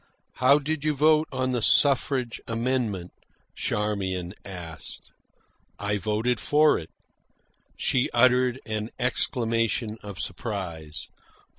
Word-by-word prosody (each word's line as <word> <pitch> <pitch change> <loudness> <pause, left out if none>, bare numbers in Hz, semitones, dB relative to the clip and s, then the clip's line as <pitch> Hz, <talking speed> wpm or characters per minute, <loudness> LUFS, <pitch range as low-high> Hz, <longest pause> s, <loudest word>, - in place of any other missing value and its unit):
"How 130 +3 +5
did 150 +1 -3
you 155 -1 +1
vote 155 +2 +4
on 130 -1 -1
the 120 -2 -1
suffrage 130 -1 +4
amendment?" 115 -6 -1 0.4
Charmian 95 -4 -2
asked. 85 -4 -7 0.7
"I 105 0 -1
voted 110 +4 0
for 150 +7 +4
it." 80 - -10 0.9
She 130 -1 +1
uttered 125 +1 +3
an 110 0 -3
exclamation 115 -3 0
of 100 -2 -8
surprise. 90 -7 -5
115 Hz, 105 wpm, -26 LUFS, 100-130 Hz, 0.9 s, How